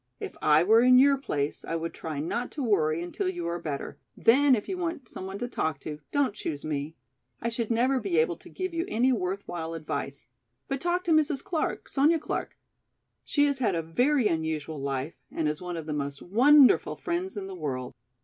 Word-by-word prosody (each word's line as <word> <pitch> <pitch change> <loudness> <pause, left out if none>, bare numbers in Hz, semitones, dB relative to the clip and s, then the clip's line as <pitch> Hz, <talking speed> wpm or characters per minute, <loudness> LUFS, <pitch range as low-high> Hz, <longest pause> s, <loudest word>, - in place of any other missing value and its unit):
If - - -6
I 155 +2 +5
were 220 +5 +6
in 250 +1 +7
your 280 +2 +6
place 150 - -3
I 165 - -3
would 165 0 -3
try 155 -3 -5
not 235 +11 -2
to 290 - -3
worry 165 -7 +1
until 370 - -2
you 355 -2 -4
are 170 +1 -2
better, 150 -4 -5 0.2
then 270 +3 +5
if 210 - -4
you 380 - -2
want 335 -8 -4
some 190 - -7
one 190 +1 -5
to 245 - -3
talk 160 - -2
to, 150 -1 -6
don't 280 -7 +1
choose 155 -8 -5
me. 150 +1 -3 0.4
I 235 - -1
should 230 -1 -2
never 250 +3 +2
be 195 -7 -1
able 160 +1 +2
to - - -15
give 370 -1 -4
you 335 0 0
any 255 - +2
worthwhile 180 -6 -3
advice. 155 -2 -5 0.4
But 275 -2 -3
talk 350 +1 0
to 345 - -1
Mrs. 300 -3 +2
Clark, 320 -3 -2
Sonya 300 +4 +3
Clark. 310 - -4 0.7
She 290 -1 +2
has 280 -2 0
had 220 -8 +1
a 165 - -1
very 245 - +2
unusual 160 -2 -2
life 135 +2 -3 0.2
and 160 - -1
is 150 +2 -2
one 180 -1 -4
of 160 - -5
the 155 - -3
most 140 -1 -3
wonderful 260 +8 +5
friends 345 - -3
in 200 - -4
the 195 - -7
world!" 135 -7 -4
200 Hz, 210 wpm, -28 LUFS, -, 0.7 s, in